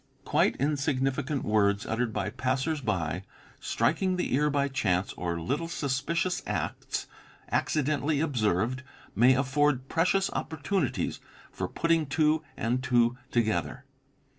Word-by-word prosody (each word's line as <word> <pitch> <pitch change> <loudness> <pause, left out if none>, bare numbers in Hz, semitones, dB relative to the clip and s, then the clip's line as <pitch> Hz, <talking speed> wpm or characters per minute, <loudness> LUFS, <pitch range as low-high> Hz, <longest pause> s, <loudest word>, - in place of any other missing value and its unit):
Quite - - +2
insignificant 140 0 0
words 100 -1 +2
uttered 115 +1 -1
by 105 -1 -2
passers 130 +5 -1
by, 90 -6 -1 0.4
strik - - +1
ing 185 -1 +2
the 180 - -1
ear 150 +3 +3
by 140 -1 +1
chance, 100 -8 0
or 85 -1 -3
little 140 - -2
suspicious 165 +4 -1
acts - - -3 0.5
accidentally 150 0 +1
observed, 120 - 0 0.3
may 125 +5 +6
afford 135 0 +1
precious 190 +4 +2
opportunities 160 - -2 0.3
for - - -3
putting 165 -2 +1
two 155 +2 +2
and 120 +3 0
two 120 -2 +3
together. 120 +3 0
130 Hz, 120 wpm, -28 LUFS, 115-150 Hz, 0.5 s, may